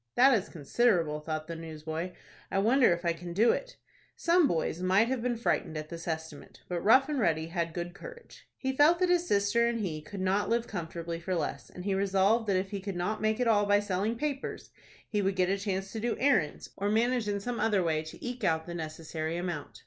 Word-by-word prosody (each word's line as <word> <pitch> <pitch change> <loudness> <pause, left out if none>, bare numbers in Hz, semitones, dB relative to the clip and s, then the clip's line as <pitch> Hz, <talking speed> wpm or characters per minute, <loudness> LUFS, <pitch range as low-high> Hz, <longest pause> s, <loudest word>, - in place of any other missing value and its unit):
"That 260 +1 +6
is 205 -2 -1
considerable," 165 - +1
thought 155 0 -4
the 165 - -5
newsboy. 160 +2 -5 0.4
"I - - -1
wonder 235 +5 +4
if 175 +1 -1
I 170 - +2
can 170 +1 -8
do 220 +6 +5
it." - - -4 0.4
Some 340 -2 +4
boys 165 +1 -1
might 190 +5 +3
have 260 -2 -1
been 240 -1 -1
frightened 165 -8 -1
at 155 0 -6
this 170 0 -8
estimate. 160 -2 -6
But 175 -1 -2
Rough 260 +5 +5
and 295 -3 -1
Ready 165 -6 +1
had 170 -1 -2
good 175 +1 -5
courage. 475 - -12
He 265 - -1
felt 305 +5 +6
that 365 0 +1
his 350 0 +2
sister 205 +4 +3
and 235 -1 -1
he 160 -6 -3
could 195 +6 -8
not 190 +2 +1
live 235 0 +1
comfortably 170 -4 -5
for 185 +2 -2
less, 165 - -3
and 180 - -9
he 200 - +1
resolved 195 +3 +2
that 200 - +2
if 190 +1 -2
he 200 - -3
could 195 -1 -5
not 205 +5 -2
make 215 +1 +1
it 250 - +1
all 205 -2 +3
by 205 0 +5
selling 205 +2 -1
papers, 280 +2 -4 0.4
he 210 -2 0
would 195 0 0
get 185 -1 +2
a 195 - +1
chance 195 -1 -3
to 225 - -4
do 235 +1 -1
errands, 245 - +1
or 200 +1 -1
manage 235 +1 +1
in 205 -1 -1
some 240 +4 -4
other 205 -4 +2
way 160 -2 +1
to 160 0 -10
eke 245 -1 -5
out 160 -3 +1
the 175 - -6
necessary 160 0 -4
amount. 175 -4 -5
195 Hz, 230 wpm, -30 LUFS, 170-230 Hz, 0.4 s, That